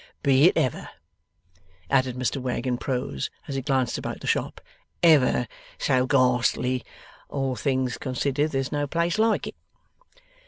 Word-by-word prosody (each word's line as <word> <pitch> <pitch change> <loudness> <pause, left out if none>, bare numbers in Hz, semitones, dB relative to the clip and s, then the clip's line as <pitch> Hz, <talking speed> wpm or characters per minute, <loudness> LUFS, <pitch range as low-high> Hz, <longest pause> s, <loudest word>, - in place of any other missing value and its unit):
Be 140 +1 +5
it 180 - +4
ever,' 130 - -1 1.0
added 130 -2 +1
Mr 130 +1 -2
Wegg 125 -1 -3
in 125 -1 -1
prose 125 - -3 0.2
as - - -4
he 135 - -2
glanced 130 -3 0
about - - -5
the - - -9
shop, - - -1 0.4
'ever 145 -7 +5 0.3
so 130 -2 +1
ghastly, 125 -1 +2 0.5
all 135 -2 -2
things 130 +1 -1
considered 140 +3 -1
there's 135 -3 -2
no 145 0 -1
place 170 +6 0
like 220 0 +2
it. - - -7
130 Hz, 145 wpm, -25 LUFS, 125-140 Hz, 1.0 s, Be